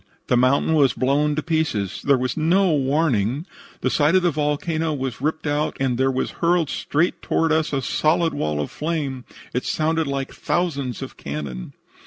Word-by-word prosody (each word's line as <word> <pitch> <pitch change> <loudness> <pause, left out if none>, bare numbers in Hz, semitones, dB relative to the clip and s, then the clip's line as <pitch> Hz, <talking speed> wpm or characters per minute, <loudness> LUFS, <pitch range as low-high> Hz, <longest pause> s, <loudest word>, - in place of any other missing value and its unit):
The - - +4
mountain 130 +6 +3
was 145 -4 +4
blown 145 +3 +1
to 155 - -2
pieces. 155 - -1
There 140 -1 +4
was 130 0 -2
no 175 +4 +3
warning. 140 - +1 0.4
The - - +1
side 155 +4 +3
of 185 - +4
the 175 - +3
volcano 155 +2 -1
was 130 -3 -4
ripped 155 +2 -1
out, 150 +1 -1
and 130 -2 +1
there 130 +2 +2
was 130 0 -1
hurled 170 -2 +2
straight 160 +5 0
toward 165 0 +1
us 160 -1 +1
a 135 -2 -1
solid 165 +4 +1
wall 75 -1 -1
of 75 - -3
flame. 145 -5 -3 0.3
It 125 - -1
sounded 160 0 0
like 135 -1 -3
thousands 140 - -2
of - - -9
cannon. 70 -4 -6
145 Hz, 180 wpm, -22 LUFS, 130-160 Hz, 0.4 s, The